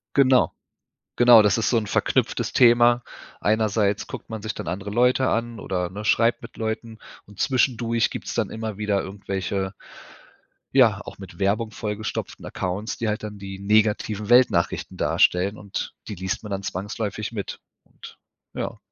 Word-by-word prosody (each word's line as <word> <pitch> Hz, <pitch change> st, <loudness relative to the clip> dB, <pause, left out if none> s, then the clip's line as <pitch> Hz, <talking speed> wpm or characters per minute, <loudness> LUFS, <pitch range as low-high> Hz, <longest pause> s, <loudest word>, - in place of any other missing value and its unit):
Genau. 130 Hz, -2 st, +4 dB, 0.6 s
Genau, 120 Hz, -2 st, +8 dB
das 105 Hz, -, +3 dB
ist 115 Hz, -, +1 dB
so 120 Hz, -, +3 dB
'n 110 Hz, -, 0 dB
verknüpftes -, -, 0 dB
Thema. 120 Hz, 0 st, +5 dB, 0.4 s
Einerseits 105 Hz, 0 st, +1 dB
guckt -, -, -8 dB
man 110 Hz, -2 st, -5 dB
sich 110 Hz, -1 st, -4 dB
dann -, -, -6 dB
andere 95 Hz, +4 st, -4 dB
Leute 125 Hz, +4 st, +3 dB
an 115 Hz, -1 st, -2 dB
oder 90 Hz, -2 st, -2 dB
ne, 100 Hz, +4 st, -7 dB
schreibt 115 Hz, +4 st, +3 dB
mit 115 Hz, -, -12 dB
Leuten, 110 Hz, 0 st, -4 dB, 0.3 s
und 105 Hz, -1 st, -16 dB
zwischendurch 120 Hz, -3 st, +1 dB
gibt's -, -, -6 dB
dann -, -, -1 dB
immer 110 Hz, -2 st, -5 dB
wieder 105 Hz, -2 st, 0 dB
irgendwelche 95 Hz, 0 st, -3 dB, 1.0 s
ja, 115 Hz, -7 st, +5 dB
auch -, -, -9 dB
mit 95 Hz, -1 st, -12 dB
Werbung 105 Hz, +3 st, 0 dB
vollgestopften 105 Hz, 0 st, -5 dB
Accounts, 95 Hz, +5 st, -3 dB
die 115 Hz, -, -2 dB
halt 105 Hz, 0 st, -2 dB
dann 105 Hz, -1 st, -6 dB
die 95 Hz, -1 st, -7 dB
negativen 105 Hz, 0 st, +1 dB
Weltnachrichten 120 Hz, -8 st, +3 dB
darstellen 95 Hz, +4 st, +2 dB
und 100 Hz, -2 st, -5 dB, 0.2 s
die 105 Hz, -, -4 dB
liest 95 Hz, +1 st, -3 dB
man 105 Hz, -, -8 dB
dann 100 Hz, 0 st, -3 dB
zwangsläufig 105 Hz, +3 st, -4 dB
mit. 105 Hz, -4 st, -6 dB, 0.2 s
Und -, -, -14 dB, 0.4 s
ja, -, -, -4 dB
105 Hz, 160 wpm, -24 LUFS, 100-115 Hz, 1.0 s, Genau